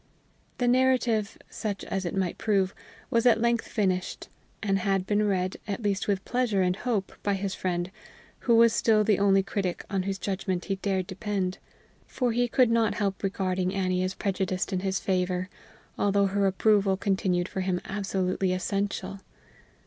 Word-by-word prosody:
The 245 Hz, -, +1 dB
narrative, 245 Hz, -4 st, +2 dB
such 205 Hz, -3 st, -4 dB
as 190 Hz, -1 st, -3 dB
it 175 Hz, -, -3 dB
might 185 Hz, -3 st, -1 dB
prove, 195 Hz, -3 st, +1 dB, 0.4 s
was 230 Hz, +1 st, +3 dB
at 225 Hz, -2 st, +5 dB
length 235 Hz, 0 st, +1 dB
finished, 185 Hz, -4 st, -1 dB, 0.3 s
and 195 Hz, -2 st, +1 dB
had 195 Hz, 0 st, 0 dB
been 210 Hz, +1 st, +1 dB
read, 185 Hz, -2 st, 0 dB
at 205 Hz, +2 st, -3 dB
least 200 Hz, -2 st, 0 dB
with 195 Hz, -2 st, 0 dB
pleasure 240 Hz, -6 st, +1 dB
and 180 Hz, 0 st, +1 dB
hope, 215 Hz, -3 st, -2 dB
by 200 Hz, -1 st, +1 dB
his 195 Hz, 0 st, -3 dB
friend, 175 Hz, 0 st, -2 dB, 0.5 s
who 235 Hz, -, +3 dB
was 230 Hz, 0 st, +6 dB
still 220 Hz, -2 st, +3 dB
the 210 Hz, -2 st, +2 dB
only 195 Hz, -1 st, +4 dB
critic 190 Hz, -2 st, -3 dB
on 195 Hz, -2 st, +1 dB
whose 195 Hz, +1 st, -2 dB
judgment 190 Hz, -2 st, -2 dB
he 195 Hz, -2 st, -2 dB
dared 190 Hz, -1 st, -1 dB
depend, 190 Hz, -1 st, -3 dB, 0.5 s
for 250 Hz, -2 st, 0 dB
he 245 Hz, +2 st, +1 dB
could 245 Hz, 0 st, +3 dB
not 230 Hz, -2 st, +2 dB
help 200 Hz, -2 st, -1 dB
regarding 185 Hz, -1 st, -1 dB
Annie 185 Hz, -1 st, 0 dB
as 185 Hz, +1 st, -2 dB
prejudiced 190 Hz, -1 st, -1 dB
in 185 Hz, -, +1 dB
his 190 Hz, 0 st, -1 dB
favor, 185 Hz, -1 st, -1 dB, 0.5 s
although 200 Hz, 0 st, +3 dB
her 195 Hz, 0 st, +1 dB
approval 195 Hz, 0 st, +3 dB
continued 190 Hz, -2 st, 0 dB
for 190 Hz, -, -4 dB
him 185 Hz, -1 st, 0 dB
absolutely 190 Hz, -2 st, -1 dB
essential. 195 Hz, +1 st, -2 dB
195 Hz, 170 wpm, -27 LUFS, 185-210 Hz, 0.5 s, was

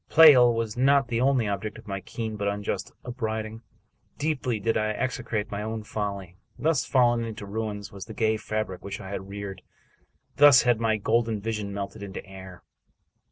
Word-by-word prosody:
Pleyel 130 Hz, -7 st, +8 dB
was 115 Hz, -2 st, -2 dB
not 135 Hz, +1 st, +3 dB
the 115 Hz, 0 st, 0 dB
only 130 Hz, -4 st, +3 dB
object 105 Hz, +2 st, -3 dB
of 110 Hz, -, -14 dB
my 100 Hz, -1 st, -3 dB
keen 110 Hz, +3 st, -5 dB
but 100 Hz, -1 st, -2 dB
unjust 100 Hz, 0 st, -3 dB
upbraiding. 110 Hz, -2 st, -4 dB, 0.6 s
Deeply 140 Hz, -6 st, -1 dB
did 115 Hz, +2 st, 0 dB
I 110 Hz, 0 st, +1 dB
execrate 120 Hz, -3 st, -3 dB
my 100 Hz, 0 st, -3 dB
own 110 Hz, 0 st, -4 dB
folly. 100 Hz, -5 st, -5 dB, 0.2 s
Thus 155 Hz, -3 st, +1 dB
fallen 120 Hz, -3 st, +3 dB
into 110 Hz, -2 st, -6 dB
ruins 105 Hz, 0 st, -4 dB
was 100 Hz, -1 st, -8 dB
the 110 Hz, -, -10 dB
gay 110 Hz, -1 st, +1 dB
fabric 110 Hz, -4 st, -4 dB
which 100 Hz, -, -5 dB
I 95 Hz, -, -8 dB
had 95 Hz, -1 st, -6 dB
reared! 100 Hz, -2 st, -6 dB, 0.8 s
Thus 145 Hz, -3 st, +8 dB
had 120 Hz, -2 st, +3 dB
my 110 Hz, -1 st, +1 dB
golden 110 Hz, +1 st, +1 dB
vision 105 Hz, -1 st, -3 dB
melted 100 Hz, 0 st, -5 dB
into 100 Hz, -2 st, -7 dB
air! 95 Hz, -2 st, -11 dB
110 Hz, 175 wpm, -26 LUFS, 100-120 Hz, 0.8 s, Pleyel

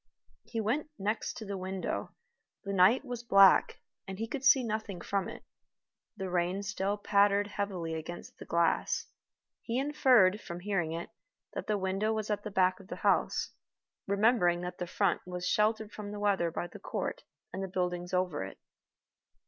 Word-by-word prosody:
He 230 Hz, -, -4 dB
went 250 Hz, +9 st, -1 dB
next 210 Hz, +3 st, -2 dB
to 220 Hz, -, -7 dB
the 200 Hz, -1 st, -4 dB
window. 190 Hz, 0 st, -4 dB, 0.5 s
The 200 Hz, -, -3 dB
night 195 Hz, +9 st, +5 dB
was 245 Hz, -2 st, -5 dB
black, 195 Hz, -5 st, +5 dB, 0.3 s
and 190 Hz, -1 st, -6 dB
he 225 Hz, -, -2 dB
could 265 Hz, +3 st, -5 dB
see 270 Hz, -1 st, +6 dB
nothing 215 Hz, -4 st, -3 dB
from 200 Hz, -2 st, -2 dB
it. -, -, -9 dB, 0.7 s
The 190 Hz, -2 st, -4 dB
rain 180 Hz, +2 st, 0 dB
still 200 Hz, 0 st, -1 dB
pattered 205 Hz, 0 st, +3 dB
heavily 195 Hz, -5 st, -3 dB
against 160 Hz, +2 st, -7 dB
the -, -, -8 dB
glass. 170 Hz, 0 st, +1 dB, 0.6 s
He 235 Hz, +1 st, -2 dB
inferred, 255 Hz, -8 st, +4 dB
from 175 Hz, -1 st, -7 dB
hearing 180 Hz, -5 st, -1 dB
it, 170 Hz, +1 st, -5 dB, 0.4 s
that -, -, -5 dB
the 210 Hz, -, +1 dB
window 195 Hz, +3 st, 0 dB
was 215 Hz, -1 st, -2 dB
at 205 Hz, -, -1 dB
the 210 Hz, -, -4 dB
back 185 Hz, -2 st, +2 dB
of 195 Hz, -, -14 dB
the -, -, -5 dB
house, -, -, +2 dB, 0.6 s
remembering 200 Hz, -4 st, +3 dB
that 180 Hz, 0 st, -6 dB
the 180 Hz, -, -3 dB
front 195 Hz, 0 st, +1 dB
was 180 Hz, 0 st, -4 dB
sheltered 215 Hz, +1 st, +1 dB
from 205 Hz, -1 st, -7 dB
the 205 Hz, -, -6 dB
weather 200 Hz, -4 st, +2 dB
by 170 Hz, -, -3 dB
the -, -, -11 dB
court -, -, -3 dB, 0.3 s
and 190 Hz, -, -4 dB
the 195 Hz, -, -2 dB
buildings 180 Hz, -1 st, -2 dB
over 180 Hz, -, 0 dB
it. 95 Hz, -, -8 dB
195 Hz, 175 wpm, -31 LUFS, 180-215 Hz, 0.7 s, see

